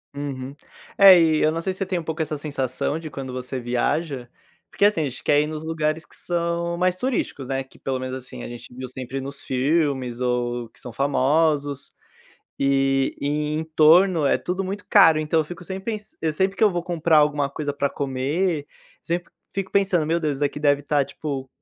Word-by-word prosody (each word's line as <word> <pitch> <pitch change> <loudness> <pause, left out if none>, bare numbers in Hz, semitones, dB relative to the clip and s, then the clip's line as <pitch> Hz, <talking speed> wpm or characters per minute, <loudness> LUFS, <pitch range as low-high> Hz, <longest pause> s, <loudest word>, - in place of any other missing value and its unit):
Uhum, 140 -1 -5 0.4
é, 195 -3 +9
e 160 -1 +3
eu 155 - +3
não 165 +1 -3
sei 190 - -1
se 185 - -7
você 195 - 0
tem 185 -1 -1
um - - -6
pouco 160 0 -5
essa 155 -1 -2
sensação 140 -1 -2
de 160 -2 -7
quando 135 -2 -6
você 125 +1 -5
viaja, 125 +2 -1 0.4
porque, - - -1
assim, 205 -6 +3
a - - +1
gente 130 - -10
quer 145 - +4
ir - - 0
nos 155 0 -5
lugares 160 0 -1
que - - -17
são 170 0 -2
mais 180 0 +2
turísticos, 220 - -2
né. 135 0 -1
Que 130 - -21
pelo 130 -1 -3
menos 130 0 -4
assim 130 -1 -10
a - - -5
gente 120 0 -10
viu 130 +1 -6
sempre 130 +1 -6
nos 140 +1 -7
filmes 130 -2 0
ou 120 -1 -1
que - - -20
são 125 - -8
famosos. 140 +2 +1 0.7
E 135 0 +2
e 150 +1 -1
em 160 - -1
torno 160 +2 +5
é - - +3
tudo 185 +2 -3
muito 200 +2 -5
caro, 165 -7 +7
então 155 +1 +1
eu - - +2
fico 175 +4 -9
sem 190 +2 -5
pensan 210 +1 -6 0.2
sempre 190 +5 0
que - - +2
eu 210 - +5
vou 175 -1 -2
comprar 170 -2 +2
alguma 150 -2 +3
coisa 145 +1 -3
pra 140 0 0
comer, 145 +4 -1 0.4
sempre 175 +1 -3 0.2
fico 195 -1 -3
pensando 195 -5 +2
meu 165 +2 +1
Deus, 155 -3 0
isso 135 - -8
daqui 145 0 -1
deve 145 -1 +2
tá 145 0 +2
tipo 140 -1 -5
150 Hz, 210 wpm, -23 LUFS, 135-170 Hz, 0.7 s, é